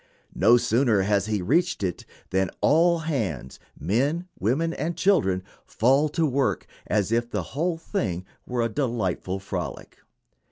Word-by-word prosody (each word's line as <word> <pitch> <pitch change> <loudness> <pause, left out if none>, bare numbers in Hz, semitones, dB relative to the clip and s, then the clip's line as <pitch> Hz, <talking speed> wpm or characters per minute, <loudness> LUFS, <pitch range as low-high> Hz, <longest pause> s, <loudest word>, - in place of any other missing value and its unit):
No 120 +2 +5
sooner 115 -3 +2
has 100 +1 +1
he 105 -4 -1
reached 170 - +1
it 90 -3 -3 0.3
than 95 -1 +1
all 170 +2 +4
hands, 95 - -3 0.2
men, 140 - 0
women, 145 - 0
and 165 +2 -3
children, 150 - +2 0.2
fall 135 +6 +2
to 160 +2 0
work 135 -1 0 0.2
as 105 0 0
if 120 +1 +1
the - - -2
whole 165 +4 0
thing 95 - -3 0.2
were 120 -1 0
a - - +2
delightful 110 - -2
frolic. 95 - -6
120 Hz, 145 wpm, -25 LUFS, 95-160 Hz, 0.3 s, No